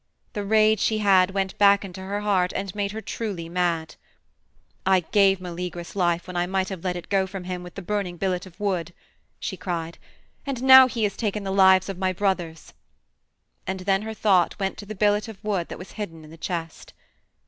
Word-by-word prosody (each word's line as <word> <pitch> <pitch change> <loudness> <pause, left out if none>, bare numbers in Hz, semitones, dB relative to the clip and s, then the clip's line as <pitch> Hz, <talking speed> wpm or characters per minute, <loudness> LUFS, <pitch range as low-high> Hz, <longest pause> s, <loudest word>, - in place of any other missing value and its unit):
The 205 -3 -3
rage 215 +1 +4
she 220 - +1
had 195 -3 +4
went 195 -1 -2
back 200 0 +5
into 190 0 -9
her 200 +2 -3
heart 190 -3 +1
and 195 -2 -3
made 200 -1 -2
her 220 +1 -6
truly 200 -8 -5
mad. 170 -2 -1 0.9
"I 190 -1 +4
gave 195 +2 +3
Meleagrus 175 -1 -6
life 175 -2 +1
when 180 -1 -8
I 175 0 0
might 190 0 -1
have 190 -4 -7
let 180 -1 -1
it 175 - -7
go 195 -1 +1
from 190 -1 -7
him 180 0 -5
with 180 0 -11
the 195 - -7
burning 195 -2 -2
billet 185 0 -2
of 185 +2 -17
wood," 180 -5 -2 0.4
she - - -4
cried, 170 -2 -4 0.4
"and 265 -3 -4
now 260 0 +9
he 235 -3 -3
has 205 -2 0
taken 210 -2 -2
the 195 - -3
lives 190 -1 +5
of 195 -2 -6
my 185 -1 0
brothers." 180 -4 -2 0.9
And 190 0 -3
then 195 +1 +1
her 220 +1 -6
thought 190 -5 +2
went 195 -1 -2
to 205 - -9
the 215 - -6
billet 210 +2 +2
of 220 -3 -9
wood 195 -5 -1
that - - -7
was 180 - -10
hidden 165 -7 -7
in 155 - -14
the - - -11
chest. 165 0 -5
190 Hz, 210 wpm, -24 LUFS, 180-205 Hz, 0.9 s, now